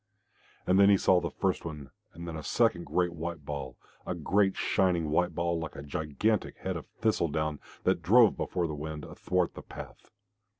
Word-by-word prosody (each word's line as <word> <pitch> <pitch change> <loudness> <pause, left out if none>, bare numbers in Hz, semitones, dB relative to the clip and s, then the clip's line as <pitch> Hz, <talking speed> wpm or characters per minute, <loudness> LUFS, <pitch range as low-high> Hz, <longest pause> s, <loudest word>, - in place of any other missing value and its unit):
And 95 +1 +4
then 100 0 +7
he 100 - +6
saw 90 -1 +4
first 95 -2 -1
one 75 -5 -7 0.2
and 85 +1 -8
then 85 - -5
a 80 - -5
second 90 0 +1
great 90 -1 +1
white 85 -2 -5
ball, 70 -3 -5 0.3
a - - -3
great 100 -1 +2
shining 90 -6 +1
white 90 +3 +1
ball 85 -1 0
like 80 -1 -6
a 70 - -7
gigantic 80 +9 -1
head - - -3
of - - -6
thistle 110 -6 0
down, 75 0 -2 0.2
that - - +2
drove 115 +2 +6
before 90 -2 -1
the 80 - -3
wind 75 +1 -5
athwart 90 -2 -1
the - - -8
path. - - -11
85 Hz, 185 wpm, -30 LUFS, 75-95 Hz, 0.3 s, then